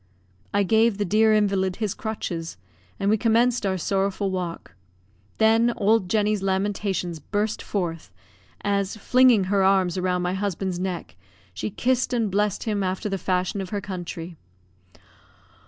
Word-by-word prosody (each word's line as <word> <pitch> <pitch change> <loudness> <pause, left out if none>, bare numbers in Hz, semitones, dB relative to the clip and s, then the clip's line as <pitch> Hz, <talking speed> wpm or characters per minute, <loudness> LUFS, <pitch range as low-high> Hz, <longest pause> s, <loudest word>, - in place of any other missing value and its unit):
I 200 0 +2
gave 220 +1 +3
the 205 - 0
dear 220 +4 +4
invalid 195 -3 +2
his 215 -2 -2
crutches, 175 -7 -5 0.4
and 195 - -1
we 215 +1 +3
commenced 230 0 +2
our 190 -1 0
sorrowful 195 +2 -1
walk. 175 - -5 0.6
Then 225 +2 +4
old 210 -2 +2
Jenny's 210 -1 +1
lamentations 195 -3 -1
burst 210 +7 -2
forth, 170 -5 -4 0.5
as, 200 0 -1
flinging 250 -1 +4
her 195 +1 +1
arms 190 -2 +2
round 180 -1 0
my 180 +1 -1
husband's 190 -2 -2
neck, 180 - -4 0.4
she - - -3
kissed 255 +4 0
and 225 -4 0
blessed 205 +1 0
him 210 -3 -1
after 190 +3 -2
the 195 -1 -2
fashion 185 +2 -1
of 190 - -6
her 205 - -2
country. 175 -3 -6
200 Hz, 145 wpm, -24 LUFS, 185-215 Hz, 0.6 s, dear